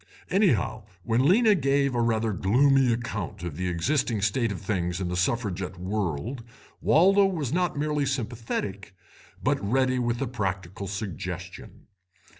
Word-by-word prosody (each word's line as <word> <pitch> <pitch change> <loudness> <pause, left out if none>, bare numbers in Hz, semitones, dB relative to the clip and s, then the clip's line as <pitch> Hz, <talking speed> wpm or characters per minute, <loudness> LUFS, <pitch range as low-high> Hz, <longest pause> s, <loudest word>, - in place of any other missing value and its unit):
Anyhow, 155 - +2 0.2
when 120 +4 +1
Lena 215 +5 +5
gave 140 -5 +1
a 120 - +1
rather 115 -2 +1
gloomy 130 +7 +3
account 105 -5 -4
of 85 -4 -4
the 90 +3 -2
existing 105 - 0
state 115 +2 +1
of 100 - -5
things 90 -3 -2
in 90 -2 -2
the 90 - -2
Suffragette 95 -1 -1
World, 100 - -3 0.4
Waldo 195 +5 +5
was 155 -9 -2
not 180 -3 0
merely 150 -1 0
sympathetic 110 -6 -4 0.5
but - - +1
ready 130 +4 +1
with 120 -1 -1
a 135 - -1
practical 95 -4 -4
suggestion. 95 -2 -6
115 Hz, 140 wpm, -26 LUFS, 95-135 Hz, 0.5 s, Lena